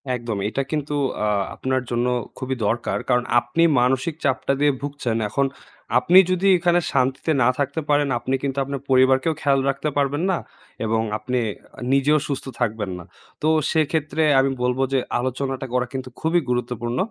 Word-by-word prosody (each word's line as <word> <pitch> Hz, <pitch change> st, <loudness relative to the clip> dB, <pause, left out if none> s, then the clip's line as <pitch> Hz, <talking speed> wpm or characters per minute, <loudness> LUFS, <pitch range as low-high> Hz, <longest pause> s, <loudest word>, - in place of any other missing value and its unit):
একদম 120 Hz, -3 st, -4 dB
এটা 135 Hz, +4 st, -1 dB
কিন্তু 150 Hz, -1 st, -2 dB, 0.3 s
আ -, -, +1 dB, 0.3 s
আপনার 130 Hz, 0 st, -1 dB
জন্য 120 Hz, +1 st, +1 dB, 0.3 s
খুবই 130 Hz, 0 st, -3 dB
দরকার। 115 Hz, +3 st, 0 dB
কারণ 125 Hz, -1 st, +3 dB, 0.2 s
আপনি 120 Hz, +8 st, 0 dB, 0.2 s
মানসিক 130 Hz, +5 st, +1 dB
চাপটা 135 Hz, 0 st, +1 dB
দিয়ে 145 Hz, 0 st, +5 dB
ভুগছেন। 140 Hz, -5 st, -2 dB
এখন 140 Hz, +6 st, +1 dB, 0.5 s
আপনি 175 Hz, +9 st, +6 dB
যদি 185 Hz, +2 st, +1 dB
এখানে 175 Hz, 0 st, +3 dB
শান্তিতে 130 Hz, +3 st, +1 dB
না 120 Hz, -, +5 dB
থাকতে 140 Hz, +3 st, -1 dB
পারেন 145 Hz, 0 st, +3 dB
আপনি 130 Hz, +3 st, -1 dB
কিন্তু 140 Hz, -1 st, -2 dB
আপনার 140 Hz, 0 st, -5 dB
পরিবারকেও 130 Hz, +4 st, +4 dB
খেয়াল 140 Hz, -1 st, +3 dB
রাখতে 140 Hz, +2 st, -1 dB
পারবেন 145 Hz, +3 st, +1 dB
না 180 Hz, -, +1 dB, 0.5 s
এবং 110 Hz, +1 st, +1 dB, 0.2 s
আপনি 125 Hz, +4 st, -2 dB, 0.5 s
নিজেও 140 Hz, +3 st, +4 dB
সুস্থ 140 Hz, -2 st, -3 dB
থাকবেন 110 Hz, -5 st, -1 dB
না। -, -, -9 dB, 0.4 s
তো 155 Hz, -, +1 dB, 0.2 s
সেক্ষেত্রে 155 Hz, 0 st, 0 dB, 0.2 s
আমি 135 Hz, 0 st, +2 dB
বলবো 125 Hz, +2 st, +1 dB
যে 135 Hz, -, +3 dB, 0.2 s
আলোচনাটা 130 Hz, +1 st, -3 dB
করা 125 Hz, -1 st, +1 dB
কিন্তু 130 Hz, -1 st, -5 dB
খুবই 165 Hz, +2 st, +2 dB
গুরুত্বপূর্ণ। 120 Hz, 0 st, -2 dB
135 Hz, 160 wpm, -22 LUFS, 125-145 Hz, 0.5 s, আপনি